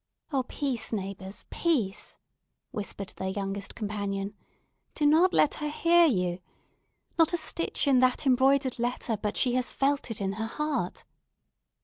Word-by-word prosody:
"Oh, 270 - +3
peace, 255 -1 -2
neighbours—peace!" 195 - -2 0.5
whispered 200 -2 -5
their 190 - -3
youngest 195 +1 -4
companion; 200 -2 -3 0.6
"do 300 - +1
not 325 +5 +5
let 300 - +4
her 300 - -1
hear 340 +3 +5
you! 180 - 0 0.8
Not 325 +1 +4
a - - +2
stitch 320 -1 -1
in 265 -2 +5
that 255 +2 +2
embroidered 265 0 +3
letter 240 -1 -1
but 210 0 -3
she 250 - +2
has 255 0 +1
felt 280 -1 0
it 225 - -3
in 195 -1 -1
her 220 +2 -3
heart." 300 +4 -2
245 Hz, 140 wpm, -28 LUFS, 200-290 Hz, 0.8 s, not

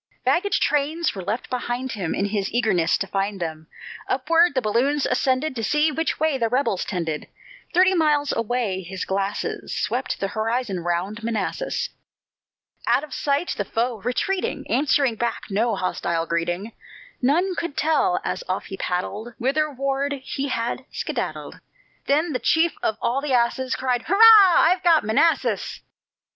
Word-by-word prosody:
Baggage 400 +4 +2
trains 300 +3 +1
were 195 - -6
left 210 +7 -3
behind 250 +1 -2
him, 190 -8 -3
In 200 - 0
his 200 -1 -2
eagerness 200 -9 +2
to - - -2
find 195 +1 -2
them; 160 -2 -5 0.4
Upward 330 +4 +3
the 260 - +2
balloons 260 +7 +1
ascended, 260 +3 0
To 225 - -3
see 300 +8 +2
which 325 +3 -2
way 310 -3 +1
the 230 -1 +1
rebels 250 -6 0
trended; 165 -5 -3 0.4
Thirty 370 +2 +4
miles 300 -4 +2
away 230 -4 -1
his 185 +1 -5
glasses 195 +1 -3
Swept - - -2
the 195 - -1
horizon 220 -1 -1
round 175 +6 -2
Manassas. 230 - -2 1.0
Out - - +3
of 300 - -9
sight, 285 +4 0
the 205 - -1
foe, 230 +2 -2
retreating, 365 +10 -1
Answered 275 -4 +2
back 235 0 -2
no 220 +3 +1
hostile 170 -3 -1
greeting; 175 +6 -2 0.5
None 340 +9 +2
could 340 -4 -4
tell, 355 +4 +2
as - - -3
off - - -2
he 195 - -7
paddled, 205 +6 -3
Whitherward 275 0 0
he 275 +1 -3
had 240 0 -2
skedaddled. - - -4 0.5
Then 305 +3 +2
the 250 - -1
chief 320 +7 +2
of 220 - -1
all 260 +4 +1
the 285 -2 -2
asses 250 +2 +1
Cried: 250 -2 0
"Hurrah! 405 -2 +8
I've 360 +2 +3
got 335 -3 +4
Manassas." 290 +10 +1
250 Hz, 155 wpm, -23 LUFS, 205-300 Hz, 1.0 s, Hurrah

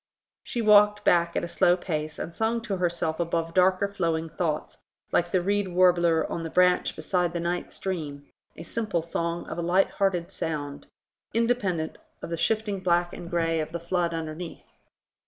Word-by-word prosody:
She 235 - -3
walked 210 -1 +6
back 170 -2 +3
at - - 0
a - - -2
slow 175 +1 +3
pace, 155 -4 -4
and 165 - -6
sung 225 +3 0
to 205 -4 -3
herself 170 -2 -1
above 165 -1 -1
her - - -16
darker 185 +2 +3
flowing 165 -5 -1
thoughts, 155 -2 -3 0.3
like 175 - +2
the 180 -1 +1
reed 200 +1 +1
warbler 175 -2 +3
on 170 - -4
the 165 - -4
branch 180 +1 +3
beside 180 -2 0
the 170 - -2
night 175 +1 -2
stream; 150 -7 -5 0.3
a 165 - -7
simple 200 -4 -2
song 170 0 -2
of 170 - -6
a - - 0
lighthearted 180 0 +1
sound, 145 -3 -4 0.5
independent 205 -9 0 0.2
of - - -6
the - - 0
shifting 215 +1 0
black 175 -1 +1
and 175 -1 -8
grey 165 -1 +1
of 155 0 -3
the 170 - -4
flood 170 0 0
underneath. 165 +1 -6
175 Hz, 175 wpm, -26 LUFS, 165-190 Hz, 0.5 s, walked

